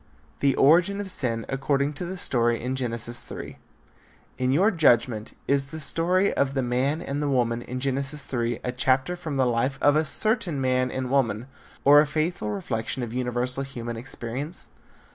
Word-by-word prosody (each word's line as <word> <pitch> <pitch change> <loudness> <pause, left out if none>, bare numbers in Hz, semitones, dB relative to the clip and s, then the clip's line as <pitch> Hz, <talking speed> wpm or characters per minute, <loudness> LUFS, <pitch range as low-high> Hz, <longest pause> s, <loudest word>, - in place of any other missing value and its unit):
THE 140 -1 +2
ORIGIN 175 +8 +4
OF 200 -2 -4
SIN 115 -7 -1
ACCORDING 140 +1 0
TO 175 +4 -4
THE 190 +2 -5
STORY 120 -7 +1
IN 125 +2 -3
GENESIS 120 -2 -3
3. - - -8 0.8
In 130 0 +1
your 190 +11 +4
judgment 120 - +2
is 140 -1 +1
the 160 +3 -7
story 180 +6 +2
of 140 0 0
the 135 - +1
man 130 +6 0
and 140 +2 -3
the 145 - 0
woman 120 -3 +1
in 125 +1 -5
Genesis 135 +2 -2
3 120 -2 -2
a 125 - -1
chapter 130 +6 +1
from 155 -5 -5
the 130 - +3
life 125 +3 0
of 145 0 +4
a 155 - +3
certain 195 - 0
man 130 -1 +1
and 130 0 -3
woman, 120 -5 +1 0.4
or 145 +1 +8
a 150 - 0
faithful 155 -6 -1
reflection 110 +4 -3
of 115 -1 -5
universal 125 +1 -1
human 120 -4 -5
experience? 125 +6 -6
135 Hz, 180 wpm, -25 LUFS, 120-150 Hz, 0.8 s, or